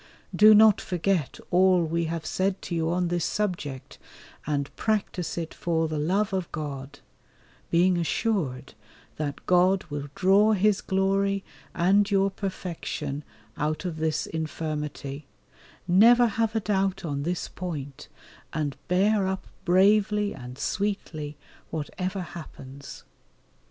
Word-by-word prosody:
Do 215 +1 +8
not 215 -1 +6
forget 180 -4 -1
all 185 -1 +5
we 165 +1 -1
have 165 -1 -4
said 190 +2 0
to - - -5
you 165 -1 0
on 175 0 0
this 175 -1 0
subject, 170 -10 -3 0.5
and 140 -2 -2
practise 205 -6 -1
it 165 -1 -4
for 165 -2 0
the 155 -1 -3
love 195 +7 0
of 185 -3 -2
God, 145 -2 -6 0.7
being 175 +1 +3
assured 160 - -1 0.4
that 145 -2 -4
God 185 +2 +4
will 145 -1 -4
draw 200 +3 +4
His 205 0 +2
glory 195 +1 +1 0.3
and 200 +3 +3
your 195 -1 +2
perfection 170 -7 -4 0.3
out 155 +4 -2
of 170 -3 -3
this 155 -1 0
infirmity, 150 -3 -4 0.6
never 235 +7 +6
have 225 0 0
a - - +3
doubt 195 -2 0
on 140 -3 -2
this 175 +4 -2
point, 145 -7 -6 0.5
and 150 -3 -2
bear 195 +2 +2
up 190 0 -3 0.2
bravely 205 +3 +3
and 125 -1 -9
sweetly 160 -8 -3 0.3
whatever 185 +5 -4
happens. 140 -5 -10
175 Hz, 125 wpm, -26 LUFS, 155-195 Hz, 0.7 s, Do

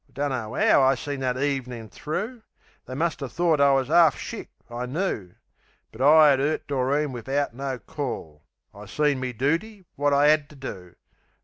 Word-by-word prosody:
I - - -28
dunno 130 -6 -3
'ow - - +4
I 135 0 +4
seen 145 -1 -5
that 130 -1 -1
evenin' 130 -5 -3
thro'. 190 - -5 0.5
They 130 - -6
muster 160 -2 -1
thort 165 +2 +1
I 140 0 +5
was 135 +1 0
'arf 165 -3 +5
shick, - - -7 0.2
I 120 +1 -5
knoo. 125 - -3 0.6
But 110 - -10
I 150 +2 +7
'ad 135 - 0
'urt 150 +3 -1
Doreen 140 +2 0
wivout 135 +2 -2
no 135 +1 -4
call; 125 - -6 0.3
I 100 +1 -11
seen 145 +3 +1
me 130 -1 -3
dooty, 170 - -2
wot 145 +1 +1
I 145 +1 +5
'ad 150 -1 +2
to 150 - -15
do. 95 -10 -9
140 Hz, 180 wpm, -25 LUFS, 125-150 Hz, 0.6 s, I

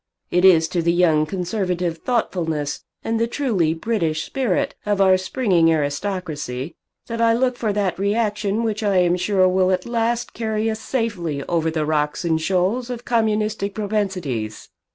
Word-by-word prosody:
It 180 +1 +2
is 165 -4 +6
to 175 - 0
the 170 +1 +2
young 160 -3 +3
conservative 180 -2 -2
thoughtfulness 160 - -1 0.2
and 225 0 -1
the 230 - +1
truly 210 - 0
British 165 -6 -1
spirit 255 -9 -1
of 205 -1 0
our 190 -1 +6
springing 185 -4 +2
aristocracy 150 -3 -2 0.3
that 230 0 -4
I 230 0 +4
look 250 +1 +1
for 225 -3 -1
that 200 -3 -1
reaction 210 +1 0
which 220 -1 -1
I 200 -3 +2
am 175 -1 +3
sure 185 +1 +2
will 185 0 +2
at 185 -1 0
last 235 0 -1
carry 220 -1 -1
us 220 - -4
safely 190 - -2
over 165 0 0
the 160 -1 -1
rocks 150 +2 -1
and 160 -1 +1
shoals 195 +8 0
of 245 -1 -6
communistic 215 -3 0
propensities." 185 - -3
190 Hz, 160 wpm, -21 LUFS, 165-220 Hz, 0.3 s, is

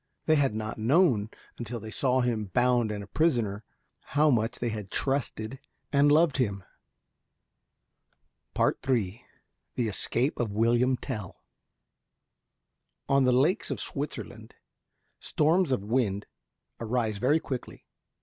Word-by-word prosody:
They 155 - +4
had 135 -7 +2
not 110 0 -4
known, 120 - +3 0.3
until 120 0 -5
they 110 0 -8
saw 130 +1 +1
him 115 -4 0
bound 120 +2 +2
and 105 -1 -4
a - - -11
prisoner, 115 - 0 0.4
how 150 +1 +2
much 115 -1 0
they 120 - -2
had 105 -3 -5
trusted 130 -2 -2 0.3
and 145 +1 +5
loved 155 -1 +4
him. 100 -7 -1 2.0
III 115 -4 0 0.5
THE 120 - 0
ESCAPE 120 +6 0
OF 115 -4 -1
WILLIAM 120 +4 +2
TELL 105 -10 -6 1.7
On 140 -1 +3
the 125 - +4
lakes 145 - +2
of - - -3
Switzerland - - -6 0.6
storms 165 +1 +2
of 125 -7 0
wind 105 -3 0 0.5
arise 115 -3 -1
very 145 +8 +3
quickly. 130 -5 -6
120 Hz, 120 wpm, -28 LUFS, 110-135 Hz, 2.0 s, and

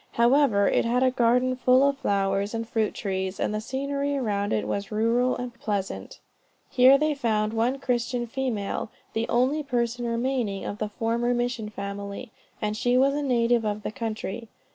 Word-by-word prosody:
However, 235 -4 +4
it - - +2
had 245 +2 +1
a 255 - +4
garden 250 +1 +2
full 255 +2 +4
of 280 -1 -1
flowers 200 0 0
and 225 0 -3
fruit 225 -3 -1
trees, 190 -1 -3
and - - 0
the 215 - -2
scenery 280 +4 -2
around 205 -5 -1
it - - 0
was 200 +1 -3
rural 230 +4 +2
and 245 -1 -5
pleasant. 205 -4 -4 0.5
Here 260 +2 +7
they 305 +1 +1
found 220 -5 0
one 235 +4 +1
Christian 245 -2 -1
female, 230 -4 -3 0.2
the 225 +1 -1
only 260 +6 +2
person 240 -3 -1
remaining 235 -4 -1
of 205 - -5
the 215 - -2
former 235 +3 0
mission 240 -3 -2
family, 200 +3 -6 0.3
and 210 0 -2
she 245 +3 +2
was 275 +2 +4
a 295 - -1
native 240 -3 +2
of 210 -1 -2
the - - -3
country. 225 0 -5
235 Hz, 175 wpm, -26 LUFS, 215-255 Hz, 0.5 s, Here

